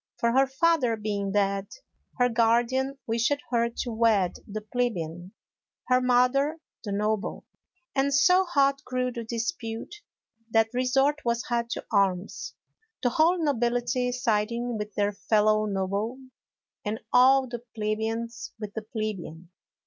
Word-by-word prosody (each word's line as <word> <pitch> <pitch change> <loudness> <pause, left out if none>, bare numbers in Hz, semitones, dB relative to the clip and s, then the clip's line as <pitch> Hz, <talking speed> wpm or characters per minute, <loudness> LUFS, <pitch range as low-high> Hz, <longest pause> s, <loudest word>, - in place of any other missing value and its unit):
For 235 - +1
her 270 +2 +4
father 270 -3 +2
being 205 -2 -2
dead, 200 -1 +1 0.5
her 245 -1 +4
guardian 240 +4 +2
wished 235 +5 +1 0.2
her 235 -1 +2
to 235 +1 -4
wed 220 -5 +2
the 215 +1 -5
plebeian, 185 -7 -3 0.6
her 255 0 +4
mother 255 +5 +2 0.2
the 205 - -4
noble. 210 +1 -1 0.5
And 275 +1 +1
so 360 +6 +5
hot 280 -5 +2
grew 250 0 -1
the 235 -1 -5
dispute 230 - -4 0.5
that 225 +1 +2
resort 270 +4 +2
was 235 0 0
had 235 -1 0
to - - -6
arms, 195 -2 0 0.5
the 245 - +4
whole 325 +7 +3
nobility 245 -2 0
siding 235 -1 -1
with 210 0 -4
their 205 0 +1
fellow 215 +1 +2
noble, 200 +4 -2 0.7
and 215 +2 -3
all 260 +2 +6
the 240 -1 -6
plebeians 225 +2 -3
with 210 -2 -6
the 220 - -4
plebeian. 200 -6 -5
235 Hz, 135 wpm, -27 LUFS, 215-255 Hz, 0.7 s, all